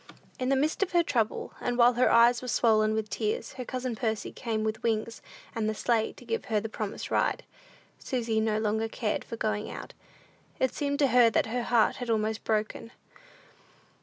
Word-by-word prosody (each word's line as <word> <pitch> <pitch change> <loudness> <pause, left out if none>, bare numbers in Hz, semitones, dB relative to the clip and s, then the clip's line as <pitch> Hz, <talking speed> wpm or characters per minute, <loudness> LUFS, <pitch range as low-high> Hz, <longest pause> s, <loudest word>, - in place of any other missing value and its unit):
In 255 0 -1
the 275 - +4
midst 300 +7 0
of 385 -2 0
her 345 -1 +4
trouble, 230 -8 -1
and 245 0 -1
while 240 0 +6
her 245 +2 +3
eyes 235 +1 +5
were 255 - -7
swollen 215 -2 +3
with 220 -1 -2
tears, 215 +1 -2
her 255 - -6
cousin 255 -1 -3
Percy 220 -1 -2
came 220 -2 -3
with 220 0 -2
Wings 225 0 -1 0.3
and 220 -1 -1
the 215 - -2
sleigh 225 0 +1
to - - -15
give 455 0 -2
her 215 -2 +1
the 220 - -4
promised 215 -1 -5
ride. - - +1 0.6
Susy 230 -4 -1
no 220 -1 +1
longer 220 +1 0
cared 220 -1 -2
for 230 - -7
going 215 -1 -2
out: - - -8 0.7
it 260 - +1
seemed 285 -1 -1
to 280 -2 +3
her 245 -1 +6
that - - +1
her 245 +3 -2
heart 235 -1 +2
was 245 -1 -5
almost 220 -1 0
broken. 220 +1 -2
225 Hz, 195 wpm, -28 LUFS, 220-250 Hz, 0.7 s, while